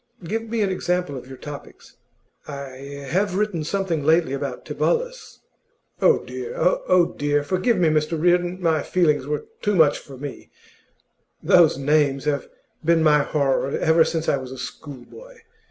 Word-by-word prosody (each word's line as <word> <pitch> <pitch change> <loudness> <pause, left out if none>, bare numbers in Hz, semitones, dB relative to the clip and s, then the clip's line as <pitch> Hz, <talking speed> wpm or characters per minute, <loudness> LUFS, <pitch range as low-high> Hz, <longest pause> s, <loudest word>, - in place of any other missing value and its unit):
Give 220 +7 -2
me 225 -1 0
an 195 - 0
example 180 -5 -1
of 125 -1 -8
your 130 0 -10
topics.' 145 +1 -11 0.5
'I 140 0 -8
have 190 +2 +1
written 200 -5 -1
something 170 -3 -1
lately 160 -2 +3
about 140 - -4
Tibullus.' - - -2 0.6
'Oh, - - +4
dear! 440 +6 -6
Oh, 340 - +2
dear! 145 0 0
Forgive 190 +8 +1
me, 175 -2 +3
Mr 155 +1 0
Reardon; 175 +2 +2
my 165 -4 +1
feelings 150 -7 +1
were 150 0 -3 0.2
too 210 -1 +1
much 155 -4 +4
for 135 -2 -12
me; 140 +1 -8 0.9
those 170 -6 +5
names 140 -1 +1
have 145 -2 -1 0.3
been 165 0 +3
my 150 -1 +5
horror 140 -2 0
ever 160 +1 +4
since 165 0 -2
I - - +2
was 130 -1 -8
a 130 - -8
schoolboy. 455 - -10
160 Hz, 155 wpm, -23 LUFS, 145-185 Hz, 0.9 s, those